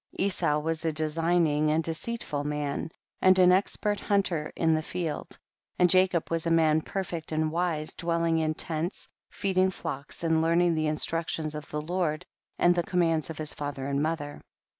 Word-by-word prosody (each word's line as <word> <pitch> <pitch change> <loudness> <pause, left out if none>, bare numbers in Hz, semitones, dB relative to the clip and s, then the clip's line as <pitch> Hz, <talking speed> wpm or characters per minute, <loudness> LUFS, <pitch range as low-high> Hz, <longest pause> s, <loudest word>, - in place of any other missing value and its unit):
Esau 180 -6 +1
was 160 +1 -2
a 165 - +1
de 155 0 +3
signing 165 -2 +2
and 160 +2 +1
deceitful 165 -2 -3
man, 150 0 -3 0.3
and 185 0 +6
an 180 -1 +6
expert 205 +2 +1
hunter 180 -7 0
in 165 -1 +2
the 155 - +1
field, 165 -2 -4 0.4
and 180 -1 +4
Jacob 185 -3 +2
was 165 0 0
a - - +2
man 160 -1 +3
perfect 175 -3 -4
and 155 0 0
wise, 165 -2 -1
dwelling 170 -1 0
in 155 -1 0
tents, 165 +4 0 0.2
feeding 190 -1 +1
flocks 155 -5 -5
and 160 -1 +2
learning 170 +1 +3
the 155 -1 0
instructions 155 0 -1
of 150 -1 -7
the 150 - -3
Lord 175 -1 -2 0.3
and 175 - +4
the 175 - +1
commands 165 -3 0
of 160 - -6
his 155 -1 -2
father 145 -2 -5
and 140 0 -1
mother. 150 -2 -3
165 Hz, 175 wpm, -27 LUFS, 155-175 Hz, 0.4 s, and